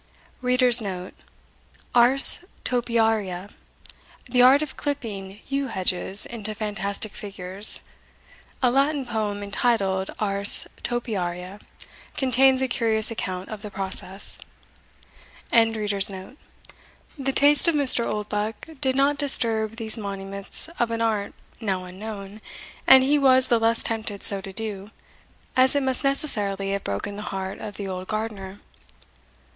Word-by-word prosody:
* - - -31
Ars 250 -1 +5 1.9
Topiaria, 220 -6 -1 0.8
the 250 0 +2
art 265 +4 +6
of 295 - -8
clipping 210 -9 -6
yew 275 0 -2
hedges 190 -1 -2
into 215 -2 -6
fantastic 210 -1 -4
figures. 195 0 +3 0.8
A 250 - +3
Latin 275 +1 0
poem, 210 -3 -4
entitled 200 -3 -1
Ars 200 -1 +5
Topiaria, 195 -5 -4 0.6
contains 265 0 +4
a - - 0
curious 225 -3 0
account 185 -4 -5
of 215 -2 -8
the 210 - -8
process. 195 0 -5 1.1
The 210 -2 -1 1.0
taste 290 +4 +6
of 335 - +2
Mr. 265 -5 +3
Oldbuck 210 +8 -5
did 260 -2 0
not 280 +1 +1
disturb 225 -6 +2
these 225 0 -5
monuments 195 +1 -3
of 240 - +1
an 230 0 -3
art 215 -3 -2 0.2
now 190 -5 -3
unknown, 200 +2 -9 0.5
and 265 0 +8
he 290 +2 +2
was 260 -2 +3
the 235 - +3
less 225 +1 +1
tempted 220 -3 -4
so 200 -1 +4
to 195 0 -9
do, 205 -1 -6 0.7
as 260 +2 +3
it 285 - +1
must 260 +1 -1
necessarily 205 -9 -1
have 200 0 -3
broken 100 - -5
the - - -6
heart 190 0 -6
of 210 -2 -8
the 200 - -6
old 185 0 -6
gardener. 210 -3 -6
215 Hz, 125 wpm, -23 LUFS, 195-250 Hz, 1.9 s, and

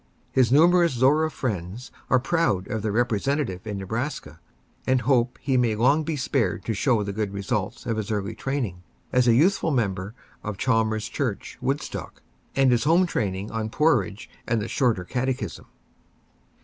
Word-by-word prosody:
His 125 -3 +3
numerous 170 +3 +5
Zorra 145 +6 +3
friends 110 - -4 0.2
are 130 - +5
proud 135 - 0
of 110 -3 -2
their 105 0 -1
representative 115 -2 0
in 105 -2 -3
Nebraska, 115 +9 -4 0.5
and 130 -1 +3
hope 125 0 +2
he 135 -2 0
may 120 -3 +2
long 140 +8 +3
be 160 0 -2
spared 130 -8 -1
to 115 - -1
show 115 -1 +2
the 100 0 -4
good 105 -1 -2
results 100 -1 -3
of 115 - -1
his 110 -2 -3
early 105 0 -2
training 120 -9 -3 0.3
as 125 -1 +4
a 115 - +6
youthful 165 +5 +3
member 105 -6 -1 0.3
of 105 -2 -4
Chalmers 110 -3 +1
Church, - - -4
Woodstock, - - -4 0.3
and 135 -2 +4
his 120 +2 +2
home 170 +4 +5
training 100 - -2
on 110 -1 -2
porridge 120 -7 +1 0.2
and 115 -1 +1
the 105 - -3
Shorter 120 -9 +1
Catechism. 125 - -3
120 Hz, 160 wpm, -25 LUFS, 105-135 Hz, 0.5 s, a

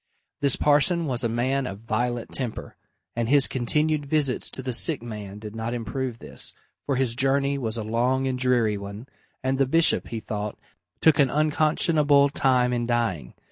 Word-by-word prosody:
This 140 -2 +3
parson 150 +4 +3
was 130 -3 -1
a 115 - +1
man 130 +3 -1
of 100 -1 -7
violent 120 +2 -2
temper, 125 -5 -4 0.4
and 115 -1 -1
his 140 -1 +5
continued 150 +4 0
visits 140 -3 +2
to 130 - -7
the 130 -1 -1
sick 135 +2 +3
man 105 -4 -7
did 105 0 -9
not 115 +2 -3
improve 120 +1 -4
this, - - -6 0.3
for 140 - +1
his 130 -3 0
journey 140 +2 +1
was 115 -3 -3
a 110 - -3
long 125 +4 0
and 130 -1 -2
dreary 120 -5 +1
one, 100 +3 -8 0.4
and 130 +1 -1
the 135 - +3
bishop, 165 +4 +3
he 115 - -5
thought, 105 -1 -5 0.4
took 160 -3 +4
an 140 -2 +4
unconscionable 150 -1 +2
time 125 -3 +2
in 120 -1 -1
dying. 115 - -2
125 Hz, 180 wpm, -24 LUFS, 115-140 Hz, 0.4 s, his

